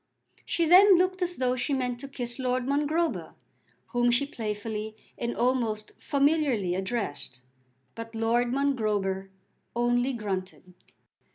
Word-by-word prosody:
She 340 - +1
then 375 +4 +8
looked 370 +1 +1
as 355 0 -1
though 255 -1 +1
she 255 +3 0
meant 250 -2 -2
to 275 - -6
kiss 245 -2 -5
Lord 255 -1 0
Mongrober, 300 +4 0 0.5
whom 240 -1 +2
she 240 +4 +3
playfully 215 -3 -4 0.2
and 235 0 -3
almost 235 -4 0
familiarly 280 - +1
addressed. 190 - -4 0.5
But 230 0 -8
Lord 230 +2 +2
Mongrober 210 -8 0 0.5
only 245 +2 +1
grunted. 190 -4 -5
245 Hz, 120 wpm, -27 LUFS, 215-280 Hz, 0.5 s, then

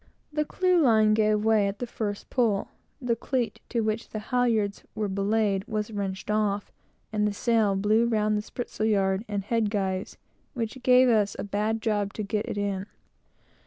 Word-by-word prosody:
The 300 0 0
clewline 275 -14 +3
gave 215 0 +2
way 220 -2 +4
at 200 +1 -3
the 245 - -3
first 210 -3 -5
pull; 225 -6 +1 0.3
the 245 -3 0
cleat 245 +1 -2
to 235 - 0
which 220 +1 -2
the - - -5 0.2
halyards 225 -5 +1
were 215 -1 -1
belayed 200 0 +1
was 215 0 -2
wrenched 200 -1 -3
off, 205 -1 0 0.4
and 210 0 +2
the 205 - -1
sail 220 -2 +2
blew 215 +4 +3
round 215 -2 +1
the 210 - 0
spritsail 220 -1 -3
yards 195 -1 +1
and 205 -2 -2
head 220 0 0
guys, 190 -2 -2 0.4
which 230 +1 -3
gave 255 +1 +6
us 215 -4 +2
a - - -4
bad 210 +2 -1
job 205 -2 0
to 215 - -4
get 210 +1 -2
it - - -4
in. 200 -1 -2
215 Hz, 175 wpm, -27 LUFS, 205-230 Hz, 0.4 s, gave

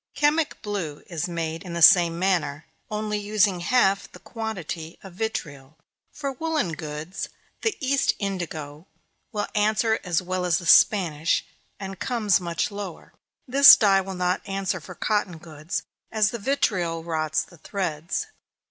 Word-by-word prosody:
Chemic 295 +1 +1
blue 180 -8 -4
is 170 -1 -4
made 165 -1 -3
in 180 -2 -8
the 170 - -3
same 170 0 +7
manner, 165 -5 0 0.2
only 210 -1 -2
using 205 -2 +1
half 195 0 +2
the - - -12
quantity 180 -8 -6
of 190 -2 -11
vitriol. 155 -9 -5 0.3
For 280 -2 -4
woollen 305 - -2
goods, 155 +3 -6 0.3
the 445 - -1
East 275 0 +1
indigo 165 -5 -5 0.4
will 210 -3 -2
answer 215 +1 +2
as 175 -3 +1
well 185 0 -3
as 175 -3 +2
the 175 - -7
Spanish, 165 -3 +4 0.3
and 195 -2 -7
comes 215 -7 +1
much 170 +2 -2
lower. 200 -4 -8 0.3
This 275 +2 +10
dye 195 -3 +4
will 190 0 -6
not 180 +1 0
answer 195 -1 -2
for 180 +3 -11
cotton 205 -5 -1
goods, 160 +1 -5 0.3
as 215 -1 +2
the 235 - -5
vitriol 180 -9 0
rots 155 -2 -1
the 175 - -18
threads. 170 - -3
185 Hz, 150 wpm, -25 LUFS, 165-210 Hz, 0.4 s, This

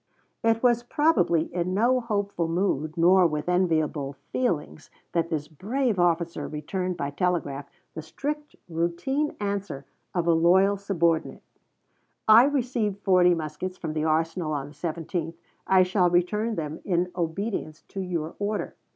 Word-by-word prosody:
It 225 +1 +2
was 240 -1 +4
probably 240 - +2
in 180 +1 -1
no 245 +5 +3
hopeful 205 -7 -2
mood 165 -3 -1
nor 180 +2 +6
with 150 -1 -3
enviable 160 -6 +1 0.2
feelings 170 -11 -2 0.2
that 170 -1 0
this 150 -3 -2
brave 215 - -1
officer 170 -1 +1
returned 180 +4 -3
by 140 0 -3
telegraph 145 -4 -1 0.2
the 160 - -5
strict 295 - -5
routine 175 - -1
answer 200 -9 -3 0.3
of 175 -2 +1
a 170 - +4
loyal 190 +5 +4
subordinate: 170 -5 0 0.8
"I 220 +3 +8
received 245 -7 0
forty 180 -2 +5
muskets 165 +4 -5
from 160 -2 -4
the 155 0 -1
arsenal 160 +1 0
on 140 -1 -3
the - - -14
17th, 165 +1 -4 0.3
I 190 -1 +6
shall 180 -1 +2
return 210 +6 +1
them 155 -2 -4
in 180 -1 0
obedience 170 -2 -3
to 195 - -6
your 170 -3 -3
order." 205 +1 -2
180 Hz, 140 wpm, -26 LUFS, 160-205 Hz, 0.8 s, I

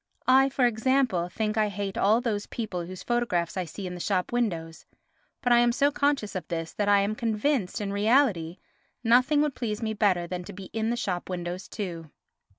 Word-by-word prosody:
I, 265 +1 +5
for 265 -2 +2
example, 240 -6 +1
think 215 +2 -2
I 215 -1 +2
hate 200 -1 -4
all 215 +4 +3
those 215 -4 -2
people 190 -7 -4
whose 185 0 -8
photographs 235 -9 0
I 185 -2 -2
see 190 +4 -7
in 180 - -5
the 180 - -7
shop 185 0 -1
windows, 170 -10 -2 0.6
but 245 -1 +4
I 240 - +6
am 240 0 +4
so 280 +4 +2
conscious 280 -7 0
of 180 -4 -5
this 165 -1 -4
that 205 -1 0
I 200 -1 +5
am 200 +2 0
convinced, 225 -1 -1
in 200 -1 -3
reality, 205 - +2 0.5
nothing 255 +6 +4
would 300 -2 -1
please 225 -3 -3
me 220 -1 -1
better 195 -5 +2
than 180 +1 -5
to 200 - -9
be 190 0 -10
in 220 0 -1
the 240 - -1
shop 180 -6 -3
windows 180 +1 -4
too. 170 -7 -6
210 Hz, 205 wpm, -27 LUFS, 180-240 Hz, 0.6 s, I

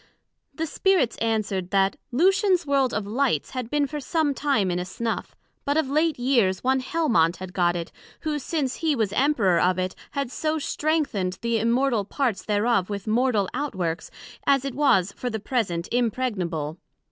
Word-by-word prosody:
The 320 - -2
Spirits 360 -4 +2
answered, 215 -5 -1
That 195 0 +2 0.2
Lucian's 370 - +3
World 275 -3 +2
of 215 -3 -2
Lights, 225 - 0
had 255 -3 -4
been 295 +1 +1
for 300 +2 -5
some 300 +1 0
time 265 -10 +1
in 175 - -1
a - - -2
snuff, 225 +5 -4 0.3
but 285 +2 0
of 310 -4 +1
late 310 +1 +2
years 240 -7 +2
one 265 +1 +2
Helmont 250 - +2
had 185 0 -8
got 175 -2 +2
it, 170 -1 -4 0.3
who 305 -2 -2
since 280 -2 -2
he 315 -3 +1
was 215 -5 0
Emperour 215 - +3
of 180 0 +2
it, 185 0 -1 0.2
had 280 -3 -2
so 310 +2 -1
strengthened 285 - -1
the 235 -1 +1
Immortal 235 0 +2
parts 225 -3 -1
thereof 210 -2 +1
with 200 -2 -4
mortal 220 -2 +2
out 285 -2 -3
works, 170 -3 -2 0.4
as 275 -1 +3
it 275 - -3
was 250 -9 +3
for 245 - -4
the 220 -2 -3
present 195 -7 -1
impregnable. 195 - -1
240 Hz, 175 wpm, -25 LUFS, 195-280 Hz, 0.4 s, Lucian's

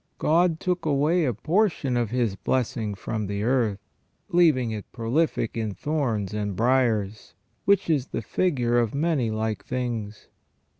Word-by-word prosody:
God 165 +1 +2
took 180 -1 -1
away 155 +3 +2
a 125 - 0
portion 160 - +1
of 120 -3 0
His 120 -4 0
blessing 110 -3 -1
from 110 +1 -4
the 100 +1 -3
earth, 115 -4 +1 0.5
leaving 155 - +3
it 105 -2 -7
prolific 120 +1 0
in 110 -3 -3
thorns 120 -10 -1
and 105 -2 -2
briars, 115 -3 +1 0.3
which 200 -1 +3
is 145 -5 +1
the - - -4
figure 125 -10 +1
of 115 +1 -1
many 145 -6 +1
like 110 0 -2
things. 115 -5 -4
120 Hz, 145 wpm, -25 LUFS, 110-155 Hz, 0.5 s, leaving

